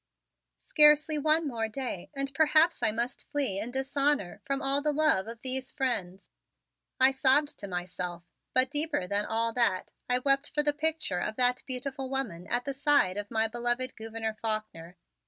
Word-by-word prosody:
"Scarcely 300 +1 +4
one 310 +2 +3
more 230 -4 -2
day 235 -5 -5
and 275 0 -2
perhaps 315 +3 +3
I - - +3
must 235 +3 -4
flee 270 -10 -1
in 215 +4 -4
dishonor 270 -5 -1
from 275 0 -1
all 275 +1 +1
the 300 +1 +1
love 295 -10 +2
of 230 0 -8
these 260 0 -3
friends," 200 -9 -3 0.7
I 260 +1 +7
sobbed 270 +2 +2
to 200 - -6
myself, 180 -1 -5 0.3
but 255 +1 +3
deeper 295 - -1
than 205 +2 -1
all 230 +1 -1
that 220 -7 0 0.2
I 250 - +5
wept 275 +2 +1
for 295 -1 0
the 295 0 +1
picture 310 - 0
of 215 - -3
that 250 0 +3
beautiful 265 +1 -4
woman 225 -11 -3
at 240 +1 -1
the 275 - -3
side 280 -9 +2
of 205 0 -5
my 225 -1 +1
beloved 240 +2 -2
Gouverneur 225 0 -4
Faulkner. 215 -6 -5
255 Hz, 175 wpm, -29 LUFS, 220-285 Hz, 0.7 s, I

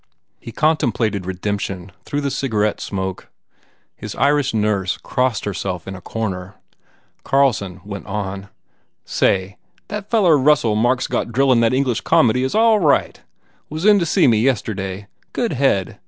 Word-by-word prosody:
He 115 - -9
contem 155 -1 +1
plated 105 -4 -2
redemption 95 0 -4
through 145 0 -2
the 140 -1 -2
cigarette 105 -7 -1
smoke. 95 -1 -4 0.7
His 105 -1 -7
Irish 140 -1 +2
nurse 105 -4 0
crossed 125 -4 -1
herself 95 -3 -4
in 95 - -5
a 95 - -10
corner. 95 -2 -5 0.7
Carlson 105 -9 +1
went 100 - -7
on, 100 -1 -4 0.6
"Say, 95 +1 0 0.3
that 210 0 -5
feller 180 -10 +4
Russell 130 -6 +3
Mark 120 +4 +2
s - - -1
got - - -1
drillin* 130 +1 +3
that 115 - +3
English 130 -3 0
comedy 125 +2 +3
is 130 - -2
all 220 -1 +4
right. 150 -6 +1 0.5
Was 155 +4 -4
in 210 -1 +6
to 170 - 0
see - - +3
me, 115 -4 +4
yesterday. 100 -5 -1 0.3
Good 235 -7 -1
head. 125 -9 0
115 Hz, 155 wpm, -20 LUFS, 100-140 Hz, 0.7 s, in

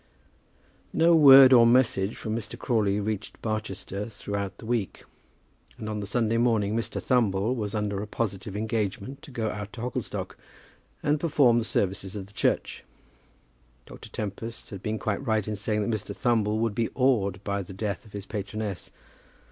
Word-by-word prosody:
No 170 +1 +5
word 135 -4 +9
or 115 -2 +8
message 115 -5 +3
from 110 0 -3
Mr. 115 - -5
Crawley 105 -5 +1
reached 105 0 -4
Barchester 105 -1 -4
throughout 100 -2 -5
the - - -11
week, 115 -4 -2 0.7
and 110 - -6
on 105 -1 -3
the 100 - -5
Sunday 115 +1 +1
morning 110 -3 +2
Mr. 115 - -2
Thumble 110 -2 +1
was 105 -2 -3
under 105 -2 -1
a 105 - -5
positive 100 -2 -3
engagement 110 +3 -3
to - - -12
go 115 -5 -2
out 105 0 -6
to 115 - -7
Hogglestock, 125 0 -4 0.6
and 145 +1 +2
perform 140 -7 +4
the - - -1
services 95 -2 -1
of 100 -2 -5
the 100 - -19
church. - - -1 1.0
Dr. - - -12
Tempest 115 +3 -6
had 100 -3 -7
been 110 +1 -2
quite 105 +3 -2
right 110 -5 0
in 105 - -2
saying 105 0 -1
that 115 - +1
Mr. 105 - -6
Thumble 110 -4 +1
would 115 -1 0
be 115 +1 0
awed 110 -8 +2
by 100 0 -1
the 95 0 -9
death 100 0 -3
of 105 - -18
his 100 -1 -6
patroness. 105 -1 -5
110 Hz, 170 wpm, -27 LUFS, 100-115 Hz, 1.0 s, word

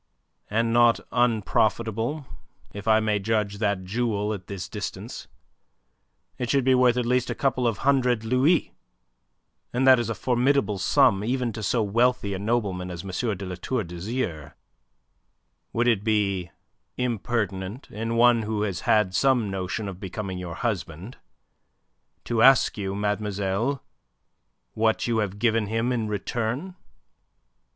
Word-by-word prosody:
"And 115 +2 +1
not 120 -1 +5
unprofitable, 115 +3 0 0.5
if 100 +2 -8
I 110 0 +5
may 105 -1 0
judge 100 -1 -1
that 100 -3 0
jewel 105 +1 -1
at 95 -3 -8
this 100 -3 -5
distance. - - -6 1.1
It 125 - -2
should 135 0 +2
be 130 +1 +4
worth 125 -1 +4
at 125 - 0
least 125 +1 +1
a - - -2
couple 130 -3 +1
of 115 -3 0
hundred 125 -4 +2
louis, 130 +9 +2 1.0
and 125 +2 0
that 130 -2 +7
is 120 - -2
a 115 - -2
formidable 125 -4 +1
sum 95 +2 +3
even 125 0 -1
to 110 - -6
so 115 +2 +1
wealthy 115 0 +1
a 95 - -3
nobleman 100 -4 -1
as 85 -2 -6
M. 100 +2 -2
de 100 - -6
La 90 - -5
Tour 110 +6 -2
d'Azyr. 85 - -4 1.2
Would 120 +1 +1
it 110 -4 +2
be 100 -5 0 0.5
impertinent 115 -2 -2
in 115 +2 -3
one 120 0 +5
who 105 -1 -2
has 95 -5 -2
had 105 -3 +2
some 125 -4 +2
notion 95 +2 -3
of 95 -2 -7
becoming 95 -1 -5
your 85 -2 -6
husband, 100 -1 -4 1.1
to 115 -2 0
ask 135 +1 +6
you, 100 -2 -3
mademoiselle, 105 +4 -1 0.9
what 110 0 +1
you 115 -2 +1
have 100 -2 -2
given 115 -1 +1
him 115 +3 0
in 115 -3 -1
return?" 120 - -3
110 Hz, 145 wpm, -25 LUFS, 100-120 Hz, 1.2 s, that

